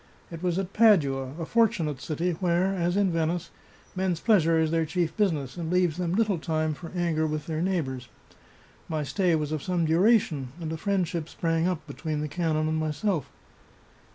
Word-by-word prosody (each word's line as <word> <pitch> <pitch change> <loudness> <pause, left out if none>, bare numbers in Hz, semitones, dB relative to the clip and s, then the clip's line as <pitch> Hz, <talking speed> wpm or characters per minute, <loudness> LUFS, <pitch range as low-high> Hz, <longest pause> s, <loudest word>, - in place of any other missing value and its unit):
It 165 -1 -7
was 180 -1 0
at 195 0 -3
Padua 140 - +3
— - - -10
a 165 - -3
fortunate 180 - +1
city, 170 +3 -1
where, 175 +2 +1
as 175 0 0
in 200 -3 +3
Venice, 165 +1 -1 0.4
men's 185 -3 0
pleasure 165 -7 +3
is 160 -1 +2
their 165 0 +2
chief 165 0 -1
business, 165 - 0
and 165 -1 -3
leaves 180 -3 +2
them 175 -1 -1
little 210 -5 +1
time 155 -1 -1
for 165 +2 -9
anger 165 -3 +1
with 155 -1 -3
their 160 -1 -2
neighbours. 140 -9 -2 0.8
My 155 -2 -1
stay 175 +3 +1
was 150 -1 -2
of 155 -2 -2
some 175 -1 0
duration, 160 - +2
and 160 -1 -4
a - - -3
friendship 175 -3 -1
sprang 165 0 0
up 175 -4 -2
between 155 +1 -4
the 150 - -2
canon 155 -1 0
and 155 0 0
myself. 155 - -1
165 Hz, 185 wpm, -27 LUFS, 155-180 Hz, 0.8 s, Padua